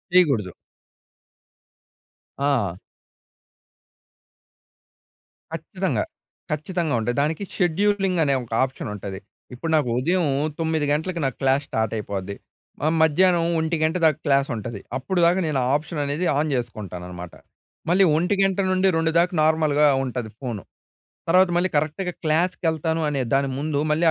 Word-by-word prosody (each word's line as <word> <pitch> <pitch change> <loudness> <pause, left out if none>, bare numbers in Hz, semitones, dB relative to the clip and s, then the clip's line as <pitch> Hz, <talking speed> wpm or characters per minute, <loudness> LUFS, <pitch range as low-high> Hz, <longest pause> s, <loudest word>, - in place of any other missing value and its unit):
చేయకూడదు. 135 - +4 1.9
ఆ! 135 -11 +1 2.8
ఖచ్చితంగా. - - -2 0.5
ఖచ్చితంగా 160 +1 -1
ఉంటది. 120 +2 -1
దానికి 155 +6 -1
షెడ్యూలింగ్ 190 +1 +1
అనే 140 -2 +2
ఒక 115 - -15
ఆప్షన్ 130 -1 -4
ఉంటది. 95 -1 -6 0.3
ఇప్పుడు 160 +6 -4
నాకు 145 -5 +2
ఉదయం 175 +5 +1 0.3
9 160 -2 0
గంటలకు 165 +4 -1
నాకు 135 - -2
క్లాస్ 135 +1 +2
స్టార్ట్ 110 -1 -1
అయిపోద్ది. 100 -1 -4 0.5
ఆహ్, 160 - +2
మధ్యాహ్నం 170 +2 +4
1:00 160 +1 0
గంట 160 +3 +1
దాక 155 -2 +4
క్లాస్ 140 -1 +2
ఉంటది. 110 -1 -5 0.2
అప్పుడు 175 +7 -2
దాకా 175 +2 +3
నేను 140 -3 0
ఆ - - 0
ఆప్షన్ 155 +1 -3
అనేది 145 +6 -1
ఆన్ 155 +1 +1
చేసుకుంటానన్నమాట. 90 -7 -6 0.6
మళ్ళీ 185 +3 +5
1:00 180 +5 +1
గంట 195 -1 +2
నుండి 185 +1 +2
2 165 0 +1
దాకా 180 +1 +2
నార్మల్‍గా 155 -2 +3 0.2
ఉంటది 125 -3 -4
ఫోను. 120 -7 -5 0.7
తర్వాత 185 +2 +5
మళ్ళీ 180 +2 +2
కరెక్ట్‌గా 155 +5 -1
క్లాస్‌కెళ్తాను 160 -1 0
అనే 140 -2 -1
దాని 135 0 +2
ముందు 150 0 -1
మళ్ళీ 155 +3 +2
155 Hz, 130 wpm, -23 LUFS, 130-170 Hz, 2.8 s, మళ్ళీ